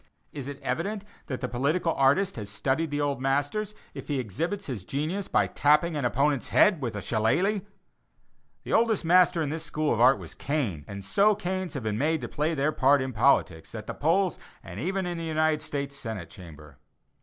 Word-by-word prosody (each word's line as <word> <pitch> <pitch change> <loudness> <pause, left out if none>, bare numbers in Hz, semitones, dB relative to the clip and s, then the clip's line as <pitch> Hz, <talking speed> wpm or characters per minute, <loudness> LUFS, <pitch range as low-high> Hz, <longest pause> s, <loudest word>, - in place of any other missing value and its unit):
Is 140 -3 -6
it 140 -1 -7
evident 200 +4 -2 0.2
that 130 -4 -4
the 125 - -1
political 150 +8 0
artist 145 +9 +2
has 105 -3 -6
studied 135 +9 -1
the 145 0 -2
old 140 -3 -1
masters, 145 +11 -1 0.2
if - - -8
he 145 -3 -1
exhibits 165 - -3
his 120 -9 -5
genius 160 - -3
by - - +2
tapping 150 +3 +2
an 145 -4 -1
opponent's 140 +2 +1
head 190 -8 +4
with 120 -4 -3
a 105 - -5
shillelagh? 145 - +1 1.0
The - - -4
oldest 225 -6 +2
master 180 -1 +4
in 145 - -2
this 160 +1 -4
school 155 -2 -1
of 115 - -1
art 130 +2 +6
was - - -9
Cain; 120 - -2
and 100 -1 -8
so 205 - +3
canes 185 -3 -3
have 135 - -4
been 110 0 -2
made 160 +3 +1
to 120 - -4
play 155 +5 -1
their 145 +2 +1
part 140 0 +4
in 130 -1 -3
politics, 105 -8 +2
at 105 -1 -6
the - - -5
polls 175 +4 +1 0.2
and 90 +3 -8
even 190 - -1
in 175 -1 -3
the - - -5
United 155 -1 +1
States 140 -1 -4
Senate 110 - -6
Chamber. 75 -4 -13
145 Hz, 200 wpm, -27 LUFS, 125-170 Hz, 1.0 s, art